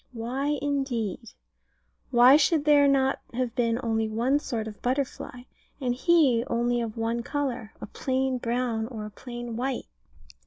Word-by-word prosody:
Why, 265 Hz, +6 st, -2 dB
indeed? 245 Hz, -7 st, -2 dB, 0.8 s
Why 250 Hz, +1 st, +7 dB
should 300 Hz, 0 st, +3 dB
there 290 Hz, -1 st, +6 dB
not 270 Hz, -1 st, +2 dB, 0.2 s
have 250 Hz, -2 st, -1 dB
been 235 Hz, -2 st, +1 dB
only 225 Hz, -1 st, 0 dB
one 245 Hz, +6 st, +1 dB
sort 225 Hz, -6 st, -4 dB
of 210 Hz, -2 st, -9 dB
butterfly, 250 Hz, -1 st, -3 dB, 0.4 s
and 250 Hz, -3 st, 0 dB
he 270 Hz, -4 st, +3 dB
only 240 Hz, +1 st, 0 dB
of 230 Hz, -1 st, -5 dB
one 230 Hz, +1 st, -1 dB
colour, 250 Hz, -5 st, -3 dB
a -, -, -6 dB
plain 260 Hz, +3 st, -1 dB
brown, 235 Hz, -2 st, -1 dB
or 220 Hz, -4 st, -6 dB
a 210 Hz, -, -8 dB
plain 240 Hz, +1 st, -7 dB
white? 255 Hz, +2 st, -2 dB
245 Hz, 150 wpm, -27 LUFS, 230-270 Hz, 0.8 s, Why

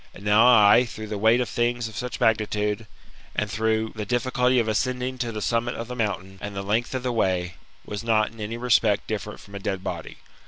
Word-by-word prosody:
And -, -, -12 dB
now 105 Hz, +3 st, +5 dB
I, 110 Hz, -1 st, +7 dB
through 110 Hz, -2 st, -8 dB
the 105 Hz, -, -3 dB
weight 110 Hz, +4 st, +4 dB
of 125 Hz, -, -1 dB
things 120 Hz, +1 st, -1 dB
of 110 Hz, -, -11 dB
such 125 Hz, +1 st, -4 dB
magnitude, 105 Hz, 0 st, 0 dB, 0.5 s
and 105 Hz, 0 st, -1 dB
through 110 Hz, 0 st, 0 dB
the 110 Hz, -, -3 dB
difficulty 125 Hz, +3 st, +1 dB
of 115 Hz, -2 st, +2 dB
ascending 125 Hz, +3 st, -1 dB
to 120 Hz, -2 st, -2 dB
the 105 Hz, -2 st, -4 dB
summit 120 Hz, +1 st, 0 dB
of 115 Hz, -, -5 dB
the 125 Hz, -, -6 dB
mountain, 95 Hz, -4 st, -3 dB
and 105 Hz, -1 st, -6 dB
the 100 Hz, -, -3 dB
length 110 Hz, +6 st, -1 dB
of 130 Hz, -, -3 dB
the 125 Hz, -, 0 dB
way, 90 Hz, -5 st, 0 dB, 0.3 s
was 105 Hz, +1 st, -5 dB
not 110 Hz, -2 st, +2 dB
in 115 Hz, -, -16 dB
any 110 Hz, +2 st, -4 dB
respect 110 Hz, -4 st, +2 dB
different 105 Hz, -1 st, -5 dB
from 100 Hz, -, -15 dB
a 100 Hz, -, -5 dB
dead 95 Hz, -1 st, -3 dB
body. 85 Hz, -4 st, -6 dB
110 Hz, 225 wpm, -25 LUFS, 105-120 Hz, 0.5 s, I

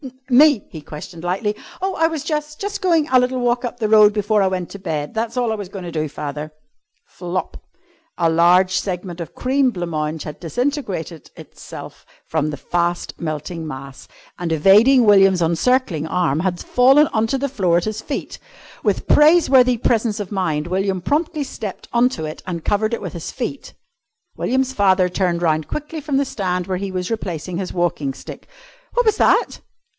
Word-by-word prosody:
"Me?" 280 Hz, -2 st, +6 dB
he 160 Hz, -, -8 dB
questioned 155 Hz, +3 st, -9 dB
lightly. 195 Hz, +4 st, -1 dB, 0.2 s
"Oh, 385 Hz, +1 st, -1 dB
I 325 Hz, -, +2 dB
was 320 Hz, -3 st, -4 dB
jus' 300 Hz, -1 st, -3 dB
jus' 405 Hz, +4 st, -4 dB
goin' 335 Hz, -5 st, +2 dB
a 255 Hz, -, +6 dB
little 250 Hz, +1 st, 0 dB
walk 245 Hz, 0 st, +1 dB
up 245 Hz, 0 st, -5 dB
the 220 Hz, -, 0 dB
road 210 Hz, -1 st, +7 dB
before 210 Hz, 0 st, +1 dB
I 195 Hz, -, +3 dB
went 185 Hz, -2 st, -3 dB
to 200 Hz, -, -8 dB
bed. 155 Hz, -5 st, -4 dB
That's 230 Hz, +2 st, -3 dB
all 240 Hz, -2 st, +1 dB
I -, -, 0 dB
was 205 Hz, -4 st, -7 dB
goin' 195 Hz, -1 st, -7 dB
to 175 Hz, -, -6 dB
do, 155 Hz, -2 st, -2 dB
father." 150 Hz, +1 st, -6 dB, 0.5 s
Flop! 180 Hz, +1 st, -5 dB, 0.6 s
A 170 Hz, -, +2 dB
large 180 Hz, +3 st, +4 dB
segment 180 Hz, -2 st, -5 dB
of 165 Hz, -, -4 dB
the -, -, -33 dB
cream 265 Hz, +1 st, +2 dB
blanc 175 Hz, -6 st, -4 dB
mange 155 Hz, 0 st, -2 dB
had 150 Hz, -, -8 dB
disintegrated 190 Hz, -, -3 dB
itself -, -, -11 dB, 0.2 s
from 155 Hz, -1 st, -1 dB
the 145 Hz, -, -5 dB
fast 175 Hz, +3 st, -1 dB
melting 160 Hz, +1 st, -4 dB
mass, 135 Hz, -2 st, -9 dB, 0.3 s
and, 175 Hz, -2 st, -3 dB
evading 210 Hz, -, +5 dB
William's 195 Hz, -3 st, +5 dB
encircling 170 Hz, -, +1 dB
arm, 165 Hz, -4 st, 0 dB
had 180 Hz, 0 st, -1 dB
fallen 270 Hz, +4 st, +5 dB
on 220 Hz, 0 st, +1 dB
to 270 Hz, -, 0 dB
the 280 Hz, +1 st, -2 dB
floor 185 Hz, -10 st, +1 dB
at 175 Hz, -, -1 dB
his 215 Hz, 0 st, -3 dB
feet. 285 Hz, -, -5 dB, 0.4 s
With -, -, 0 dB
praiseworthy 275 Hz, -6 st, +5 dB
presence 225 Hz, -2 st, 0 dB
of 205 Hz, -1 st, -5 dB
mind 165 Hz, -6 st, -1 dB
William 190 Hz, +1 st, -1 dB
promptly 305 Hz, -, -1 dB
stepped 215 Hz, -7 st, -7 dB
on 240 Hz, +1 st, +4 dB
to 160 Hz, -11 st, -5 dB
it 155 Hz, 0 st, -7 dB
and 170 Hz, -3 st, -5 dB
covered 215 Hz, +3 st, +1 dB
it -, -, -9 dB
with 180 Hz, -, -5 dB
his 170 Hz, -, -6 dB
feet. 260 Hz, +2 st, -6 dB, 0.6 s
William's 265 Hz, +1 st, 0 dB
father 190 Hz, -4 st, +3 dB
turned 175 Hz, -2 st, -1 dB
round 155 Hz, -2 st, +1 dB
quickly 305 Hz, +1 st, -5 dB
from 285 Hz, -2 st, -1 dB
the 280 Hz, -, +2 dB
stand 180 Hz, -7 st, -2 dB
where 185 Hz, 0 st, -2 dB
he 200 Hz, 0 st, -3 dB
was 185 Hz, +2 st, -3 dB
replacing 180 Hz, -5 st, -4 dB
his 190 Hz, -, -4 dB
walking 155 Hz, -6 st, -1 dB
stick. -, -, -10 dB, 0.5 s
"What -, -, +2 dB
was 435 Hz, -1 st, +3 dB
that?" -, -, +2 dB
195 Hz, 190 wpm, -20 LUFS, 170-250 Hz, 0.6 s, road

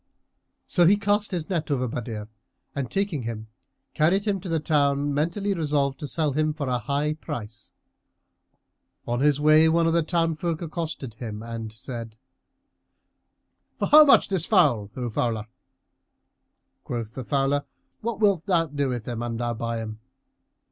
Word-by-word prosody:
So 175 Hz, -2 st, +3 dB
he 200 Hz, +3 st, +5 dB
cast 205 Hz, +1 st, +1 dB
his 175 Hz, -5 st, -3 dB
net 165 Hz, -5 st, -2 dB
over 130 Hz, -3 st, 0 dB
Badr 115 Hz, -2 st, -5 dB, 0.5 s
and 135 Hz, -4 st, -3 dB
taking 195 Hz, -7 st, -1 dB
him, 110 Hz, -2 st, -6 dB, 0.4 s
carried 180 Hz, +6 st, +2 dB
him 200 Hz, -2 st, 0 dB
to 185 Hz, -, -7 dB
the 165 Hz, -1 st, +1 dB
town, 145 Hz, -2 st, +1 dB
mentally 175 Hz, +8 st, 0 dB
resolved 145 Hz, -5 st, 0 dB
to 150 Hz, -, -4 dB
sell 155 Hz, 0 st, 0 dB
him 155 Hz, +1 st, +1 dB
for 150 Hz, -3 st, -4 dB
a 125 Hz, -1 st, 0 dB
high 140 Hz, +6 st, -1 dB
price. 115 Hz, -8 st, -8 dB, 1.4 s
On 120 Hz, 0 st, 0 dB
his 145 Hz, 0 st, +3 dB
way 155 Hz, +2 st, +6 dB
one 165 Hz, +1 st, +3 dB
of 165 Hz, -, +2 dB
the 170 Hz, -, +3 dB
townsfolk 165 Hz, 0 st, 0 dB
accosted 155 Hz, -7 st, -5 dB
him 110 Hz, -2 st, -7 dB
and 115 Hz, -1 st, -6 dB
said, 115 Hz, 0 st, -7 dB, 1.6 s
"For -, -, -1 dB
how 305 Hz, +1 st, +10 dB
much 290 Hz, -, +6 dB
this 185 Hz, -4 st, -1 dB
fowl, 135 Hz, -, +3 dB
O 125 Hz, -2 st, -3 dB
fowler?" 110 Hz, -1 st, -1 dB, 1.4 s
Quoth 115 Hz, -2 st, -5 dB
the 130 Hz, -, -5 dB
fowler, 140 Hz, +2 st, 0 dB, 0.3 s
"What 225 Hz, -2 st, -3 dB
wilt 200 Hz, -5 st, +2 dB
thou 170 Hz, -4 st, +3 dB
do 145 Hz, -3 st, -2 dB
with 120 Hz, -3 st, -4 dB
him 120 Hz, -2 st, -3 dB
an 120 Hz, -1 st, -3 dB
thou 120 Hz, 0 st, -1 dB
buy 115 Hz, 0 st, -3 dB
him?" 110 Hz, 0 st, -7 dB
145 Hz, 160 wpm, -25 LUFS, 120-165 Hz, 1.6 s, how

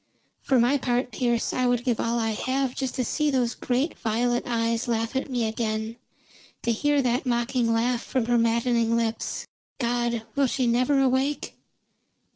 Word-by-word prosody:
"For 260 Hz, -2 st, +2 dB
my 250 Hz, +4 st, +3 dB
part, 250 Hz, 0 st, 0 dB
Pearse, 240 Hz, -2 st, 0 dB
I 255 Hz, -1 st, +1 dB
would 245 Hz, -1 st, +1 dB
give 245 Hz, -3 st, 0 dB
all 230 Hz, +1 st, 0 dB
I 225 Hz, -1 st, 0 dB
have 260 Hz, +3 st, -1 dB
just 265 Hz, -2 st, -3 dB
to 255 Hz, -, -1 dB
see 300 Hz, +4 st, 0 dB
those 250 Hz, -4 st, +1 dB
great 260 Hz, +6 st, -1 dB
violet 240 Hz, +2 st, 0 dB
eyes 230 Hz, -1 st, 0 dB
laugh 230 Hz, +1 st, -1 dB
at 265 Hz, -, -1 dB
me 240 Hz, -3 st, 0 dB
again; 220 Hz, 0 st, -2 dB, 0.7 s
to 235 Hz, -, +1 dB
hear 290 Hz, +4 st, +2 dB
that 250 Hz, +1 st, 0 dB
mocking 240 Hz, 0 st, +1 dB
laugh 235 Hz, +1 st, +1 dB
from 255 Hz, -4 st, -1 dB
her 240 Hz, 0 st, +2 dB
maddening 230 Hz, 0 st, +2 dB
lips. 230 Hz, -1 st, -2 dB, 0.3 s
God, 240 Hz, -2 st, 0 dB
will 280 Hz, -1 st, +3 dB
she 255 Hz, +1 st, 0 dB
never 250 Hz, +4 st, +2 dB
awake?" 270 Hz, +2 st, 0 dB
240 Hz, 170 wpm, -25 LUFS, 230-255 Hz, 0.7 s, my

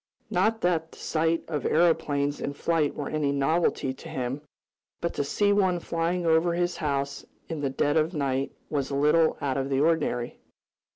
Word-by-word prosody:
Not 225 Hz, 0 st, +2 dB
that 165 Hz, -2 st, 0 dB
the -, -, -14 dB
sight 165 Hz, +1 st, 0 dB
of 150 Hz, -5 st, -3 dB
aeroplanes 145 Hz, -3 st, +2 dB
in 140 Hz, -, -2 dB
flight 160 Hz, 0 st, 0 dB
were 145 Hz, -, -4 dB
any 150 Hz, -2 st, 0 dB
novelty 140 Hz, -1 st, +1 dB
to -, -, -11 dB
him, 130 Hz, +2 st, -3 dB, 0.6 s
but 170 Hz, -, -2 dB
to -, -, -1 dB
see 205 Hz, +8 st, +2 dB
one 190 Hz, -3 st, +2 dB
flying 170 Hz, +1 st, -1 dB
over 165 Hz, +1 st, +3 dB
his 175 Hz, 0 st, 0 dB
house 140 Hz, -2 st, -2 dB, 0.3 s
in 160 Hz, -3 st, -4 dB
the 140 Hz, -, 0 dB
dead 145 Hz, +3 st, +1 dB
of 160 Hz, +1 st, +2 dB
night 140 Hz, -4 st, -1 dB, 0.2 s
was 140 Hz, -3 st, -2 dB
a 140 Hz, -, -2 dB
little 150 Hz, +3 st, +3 dB
out 135 Hz, -2 st, -1 dB
of 135 Hz, 0 st, -1 dB
the 135 Hz, -1 st, +1 dB
ordinary. 145 Hz, -6 st, 0 dB
155 Hz, 180 wpm, -27 LUFS, 140-165 Hz, 0.6 s, over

